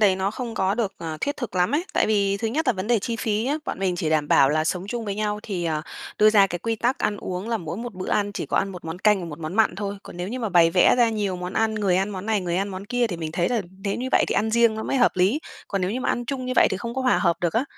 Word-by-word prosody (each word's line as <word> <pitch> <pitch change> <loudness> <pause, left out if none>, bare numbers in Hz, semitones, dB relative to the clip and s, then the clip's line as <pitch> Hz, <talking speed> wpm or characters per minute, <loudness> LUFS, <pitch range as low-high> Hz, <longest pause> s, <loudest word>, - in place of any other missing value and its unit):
đấy 195 -3 +4
nó 190 +1 0
không 230 0 -5
có 190 0 +1
được, 215 -4 -1
ờ, 160 -2 -5
thiết 285 +1 -1
thực 245 -7 -5
lắm 180 0 +2
ấy, 330 +5 +1
tại - - +3
vì 200 -2 +2
thứ 225 +2 -2
nhất 310 +7 -1
là - - +4
vấn 190 -2 -5
đề 235 -1 +3
chi 230 +3 -3
phí 215 -1 -1
nhá, 285 +4 0
bọn - - -4
mình 185 -2 0
chỉ 160 -2 -1
đảm 150 -2 +1
bảo 135 - +5
là 155 +1 +1
sống 180 +3 -2
chung 235 0 -3
với 200 -1 -3
nhau 210 0 -2
thì, 180 -5 -3
ờ, 155 -2 -1 0.4
đưa 215 0 +6
ra 200 -2 +6
cái 175 -2 -4
quy 225 +5 -2
tắc 245 +5 0
ăn 205 - 0
uống 185 +2 -5
là 230 - +1
mỗi 170 0 -5
một 235 -1 -6
bữa 185 0 -5
ăn 205 -1 +1
chỉ - - -4
có - - -2
ăn 195 0 0
một 180 -3 -10
món 165 +2 -5
canh 210 -1 +3
và - - -5
một 150 -1 -8
món 160 +2 -5
mặn 220 -4 +3
thôi, 200 0 -3
còn - - -11
nếu 180 +2 -4
như 250 - -4
mà 225 -4 -2
bày 170 -2 +5
vẽ 180 - +5
ra 235 - +5
nhiều 205 -4 -1
món 180 +1 -5
ăn, 220 +1 +1
người 200 -4 +1
ăn 195 +2 0
món 190 +1 -6
này, 215 -3 +1
người 175 -1 -2
ăn 200 +2 0
món 190 +1 -6
kia 245 0 +1
thì 180 - -4
mình 160 -2 -5
thấy 175 +1 +1
là 235 -4 0 0.2
nếu 200 - 0
như 255 +2 -3
vậy - - +5
thì - - 0
ăn 220 +1 +1
riêng 235 -1 +4
nó 220 - -4
mới 270 - -1
hợp 245 - +4
lý, 195 +12 +2 0.3
còn 195 - -1
nếu 185 +1 0
như 250 - -2
ăn 240 - 0
chung 255 0 -4
như 255 - -1
vậy - - +6
thì - - -1
không 235 +4 -5
có 265 - -2
hòa 255 - +3
hợp 170 -3 +2
được 175 -2 0
á. 240 +4 +1
205 Hz, 340 wpm, -24 LUFS, 180-230 Hz, 0.4 s, đưa